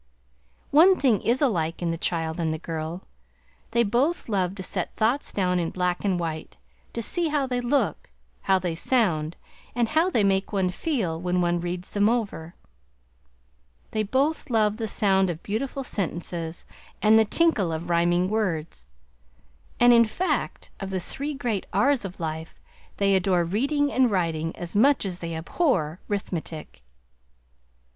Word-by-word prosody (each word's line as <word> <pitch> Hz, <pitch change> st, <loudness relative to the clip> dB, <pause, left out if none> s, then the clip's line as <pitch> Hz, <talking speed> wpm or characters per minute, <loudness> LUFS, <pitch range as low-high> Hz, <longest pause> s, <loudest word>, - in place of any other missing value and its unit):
One 360 Hz, +6 st, +6 dB
thing 245 Hz, -8 st, +3 dB
is 245 Hz, +5 st, +1 dB
alike 170 Hz, -, 0 dB
in 170 Hz, -2 st, -1 dB
the -, -, -1 dB
child 165 Hz, -1 st, -1 dB
and 160 Hz, -2 st, 0 dB
the 160 Hz, -, -2 dB
girl. 165 Hz, +3 st, -5 dB, 0.7 s
They 235 Hz, +1 st, +3 dB
both 255 Hz, -, 0 dB
love 190 Hz, -4 st, 0 dB
to 190 Hz, -, -6 dB
set 180 Hz, -1 st, -3 dB
thoughts 235 Hz, +6 st, +1 dB
down 180 Hz, -2 st, +1 dB
in 165 Hz, -1 st, -1 dB
black 180 Hz, -1 st, -1 dB
and 190 Hz, -3 st, +1 dB
white; 160 Hz, -2 st, -5 dB, 0.4 s
to 230 Hz, -, -3 dB
see 345 Hz, +8 st, -1 dB
how 295 Hz, -3 st, +1 dB
they 250 Hz, -1 st, -1 dB
look, 270 Hz, +3 st, 0 dB, 0.3 s
how 190 Hz, -1 st, +3 dB
they 180 Hz, -2 st, -2 dB
sound, 170 Hz, -6 st, +1 dB, 0.4 s
and 240 Hz, -2 st, +1 dB
how 320 Hz, +4 st, +3 dB
they 230 Hz, -, +2 dB
make 195 Hz, 0 st, +1 dB
one 190 Hz, -3 st, +1 dB
feel 190 Hz, -, -2 dB
when 180 Hz, 0 st, 0 dB
one 175 Hz, -1 st, +1 dB
reads 175 Hz, +1 st, -5 dB
them 205 Hz, +1 st, +3 dB
over. 205 Hz, -8 st, -2 dB, 1.4 s
They 215 Hz, -, 0 dB
both 270 Hz, +10 st, 0 dB
love 215 Hz, -3 st, +2 dB
the 225 Hz, -2 st, -2 dB
sound 195 Hz, -2 st, +2 dB
of 170 Hz, -1 st, -5 dB
beautiful 265 Hz, +6 st, -3 dB
sentences 170 Hz, -5 st, -4 dB, 0.3 s
and 220 Hz, +1 st, +6 dB
the -, -, +6 dB
tinkle 220 Hz, -, +2 dB
of 160 Hz, +2 st, -4 dB
rhyming 175 Hz, +1 st, +2 dB
words, 165 Hz, -, -2 dB, 0.9 s
and 245 Hz, 0 st, +7 dB
in 235 Hz, -1 st, +6 dB
fact, 360 Hz, +12 st, -2 dB
of 195 Hz, -, -5 dB
the 190 Hz, -1 st, -2 dB
three 280 Hz, +11 st, -5 dB
great 235 Hz, -7 st, -2 dB
R's 260 Hz, +7 st, +3 dB
of 190 Hz, 0 st, -7 dB
life, 160 Hz, 0 st, -5 dB, 0.4 s
they 200 Hz, -1 st, +3 dB
adore 185 Hz, -2 st, +2 dB
Reading 280 Hz, -, 0 dB
and 255 Hz, -1 st, +3 dB
Riting, 165 Hz, -4 st, -1 dB
as 175 Hz, +2 st, -7 dB
much 265 Hz, +3 st, +4 dB
as 180 Hz, -2 st, -4 dB
they 170 Hz, -2 st, -4 dB
abhor 170 Hz, -, 0 dB
'Rithmetic. 170 Hz, -, -5 dB
195 Hz, 160 wpm, -25 LUFS, 170-240 Hz, 1.4 s, and